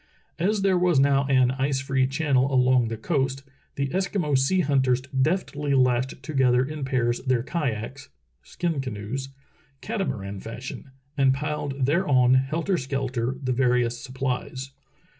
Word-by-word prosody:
As 200 +4 +1
there 190 -2 +3
was 175 -5 +3
now 140 0 +3
an 130 -2 +3
ice 135 +1 0
free 130 -1 +1
channel 135 -1 +1
along 125 -2 +3
the 115 0 -4
coast, 135 +1 -1 0.3
the 140 -1 -1
Eskimo 185 -4 0
sea 135 +8 +3
hunters 130 -4 +2
deftly 145 +1 -1
lashed 130 0 +1
together 130 -3 +2
in 150 0 -5
pairs 120 -3 0
their 130 -3 +1
kayaks 135 -4 -4 0.3
(skin 165 -5 -3
canoes), 130 +2 -5 0.5
catamaran 125 - -3
fashion, 115 +6 -8 0.3
and 135 -1 +4
piled 145 -2 -2
thereon 135 -5 +3
helter 155 +8 +1
skelter 130 -2 -2
the 130 -1 0
various 120 -1 +1
supplies. 130 0 -4
135 Hz, 135 wpm, -25 LUFS, 125-145 Hz, 0.5 s, and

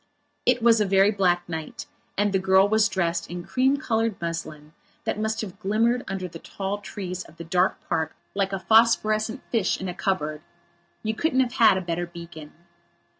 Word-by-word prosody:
It 245 -2 +3
was 230 -2 +5
a - - +3
very 195 +1 +4
black 180 -4 +1
night 160 -2 -6 0.3
and 205 0 +1
the 190 - +3
girl 190 +1 +4
was 220 0 +3
dressed 175 -3 -1
in 175 +1 -5
cream 265 +2 +2
coloured 225 -6 -1
muslin, 160 -3 -5 0.3
that - - -2
must 220 +1 -1
have 195 -3 -8
glimmered 225 +4 +1
under 190 -1 -3
the 165 -1 -10
tall 195 +3 -4
trees 185 -3 -6
of 165 - -18
the 170 - -7
dark 180 +2 0
park 160 -1 -1 0.2
like 195 -1 0
a 195 - -1
phosphorescent 220 0 +3
fish 225 -5 +1
in 190 - -4
a 180 - -3
cupboard. 155 -6 -2 0.6
You 220 0 -1
couldn't 260 +2 +1
have 250 -1 -1
had 225 -6 +5
a - - -1
better 175 0 -3
beacon. 170 -3 -10
195 Hz, 185 wpm, -25 LUFS, 175-220 Hz, 0.6 s, was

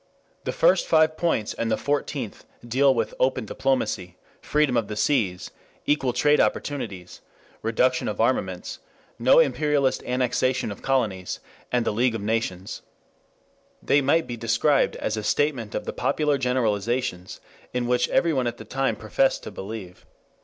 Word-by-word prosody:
The - - -1
first - - +3
five 155 0 +4
points 160 -11 0
and 115 - -2
the 110 - +1
fourteenth 145 0 -3 0.2
deal 135 +4 +4
with 115 -4 -1
"open 130 -2 +1
diplomacy," 100 -8 -1 0.2
"freedom 150 -4 +1
of 115 -3 +1
the 105 - -5
seas," 105 -7 0 0.3
"equal 140 -4 +1
trade 150 +4 +3
opportunities," 100 -11 -3 0.4
"reduction 125 +3 +1
of - - -3
armaments," - - -1 0.4
no - - +5
imperialist 150 - +2
annexation 125 -1 0
of 100 - -9
colonies, 105 -9 -1 0.3
and 120 -2 +1
the - - 0
League 120 +2 +1
of 110 - -4
Nations. 105 -4 -2 1.0
They 145 - +3
might 160 +5 +2
be 120 - -5
described 115 +6 +2
as 110 - -2
a 105 - -3
statement 130 -5 0
of - - -3
the - - -4
popular 150 -2 0
generalizations 115 -6 -1 0.3
in 125 -1 -1
which 125 0 +1
everyone 140 -7 +2
at 120 0 -3
that 110 - -12
time 135 -4 0
professed 110 +5 0
to - - -7
believe. 95 -3 -8
125 Hz, 150 wpm, -25 LUFS, 110-140 Hz, 1.0 s, no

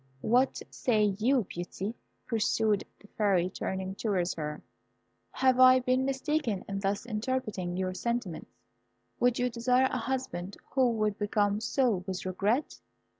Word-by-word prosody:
What 250 - +2
say 210 -5 +1
you, 250 +2 +3
Beauty?" 190 +4 -5 0.3
pursued 220 -2 +1 0.2
the 205 - -17
Fairy, 185 -4 +2
turning 190 0 -3
towards 195 -4 -1
her; 150 -1 -5 0.7
"have 260 -1 +2
I 255 0 +8
been 255 +1 +1
mistaken 270 -6 -1
in 195 0 -3
thus 195 +2 -1
interpreting 215 -6 -2
your 185 0 -1
sentiments? 235 -4 -3 0.7
Would 245 0 +3
you 250 - +1
desire 250 +2 +2
a 255 - -1
husband 225 -7 -3
who 260 -2 +3
would 215 -2 -1
become 205 0 +1
so 230 -5 +1
with 185 -1 -4
regret?" 205 - 0
215 Hz, 135 wpm, -29 LUFS, 190-255 Hz, 0.7 s, I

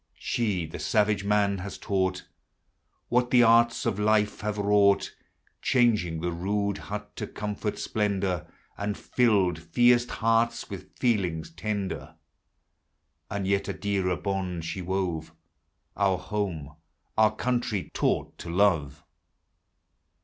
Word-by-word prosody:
She 100 -8 -1
the 80 - -8
savage 105 -2 +1
man 100 -1 +2
has 100 +2 -6
taught 95 -2 -1 0.8
"What 125 0 +2
the 125 -1 +6
arts 115 +1 +4
of 110 -4 0
life 105 0 +2
have 105 0 -2
wrought; 100 -1 +3 0.5
Changed 105 -10 +2
the 90 - 0
rude 100 +3 -1
hut 105 0 -7
to - - -3
comfort, 105 0 -4
splendor, 100 -5 -1 0.3
And 100 0 -2
filled 100 -9 +2
fierce 120 +8 +3
hearts 115 +1 0
with - - -9
feelings 90 -10 0
tender 100 +3 -4 1.1
And 100 -1 -3
yet 100 0 +1
a - - -2
dearer 95 -3 0
bond 95 -4 -3
she 95 +3 -4
wove, 90 -4 -2 0.3
— - - -48
Our 100 -2 +2
home, 90 -6 -4 0.4
our 110 -1 +4
country, 120 -5 -1
taught - - 0
to 85 - -7
love. 85 -6 +1
100 Hz, 125 wpm, -27 LUFS, 90-105 Hz, 1.1 s, the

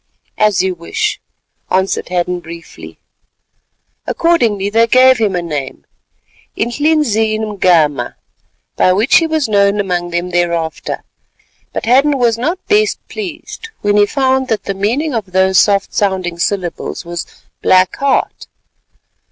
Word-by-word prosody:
"As 210 -3 +3
you 190 -1 0
wish," 170 -1 -3 0.5
answered 190 -1 0
Hadden 180 0 -1
briefly. 170 0 -11 1.1
Accordingly 230 - +1
they 230 +2 +3
gave 255 +1 +5
him 210 -4 +1
a 175 - -2
name, 140 - -5 0.7
Inhlizin 235 -4 +1
mgama, 170 - +1 0.6
by 185 - +3
which 215 +8 +4
he 330 - +2
was 315 -3 0
known 200 -1 +2
among 180 -3 -1
them 175 +1 -3
thereafter, 170 -2 -2 0.7
but - - -4
Hadden 275 +5 +3
was 240 -3 +2
not 335 +11 -3
best 425 +1 +2
pleased 390 +3 -7
when 205 0 +1
he 205 0 +4
found 265 +1 +1
that 220 -3 -1
the 195 - -3
meaning 240 +11 -1
of 205 -6 -4
those 190 0 +4
soft 200 -1 +2
sounding 185 -4 -1
syllables 180 -1 -3
was 170 0 -5 0.3
"Black 185 0 +3
Heart." 275 -1 -1
205 Hz, 130 wpm, -15 LUFS, 180-255 Hz, 1.1 s, gave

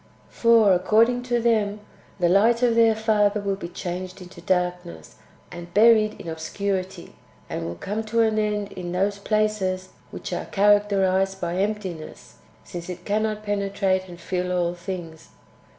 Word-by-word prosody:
For, 230 -4 +5
according 225 +7 +3
to 240 -1 +2
them, 215 -3 +1 0.4
the 175 - +3
light 225 +7 +3
of 240 -2 +4
their 225 -1 +4
Father 210 -1 +2
will 200 -1 -1
be 195 -3 -7
changed 180 +1 -6
into 180 0 -12
darkness 180 - -2 0.3
and 175 0 -9
buried 215 -1 +5
in - - -9
obscurity, 185 +4 -4 0.3
and 80 - -4
will 85 - -5
come 210 - -4
to 230 +1 +1
an 220 -1 +2
end 210 -1 -1
in 180 -2 -6
those 200 +2 0
places 200 -3 -1 0.2
which - - -7
are - - -3
characterized 195 -2 +2
by 175 0 -3
emptiness, 190 -5 -4 0.3
since 175 0 -8
it 180 0 -7
cannot 215 0 -1
penetrate 195 -2 0
and 175 -1 -11
fill 180 +1 -3
all 175 -1 0
things. 175 -2 -7
195 Hz, 150 wpm, -24 LUFS, 180-215 Hz, 0.4 s, For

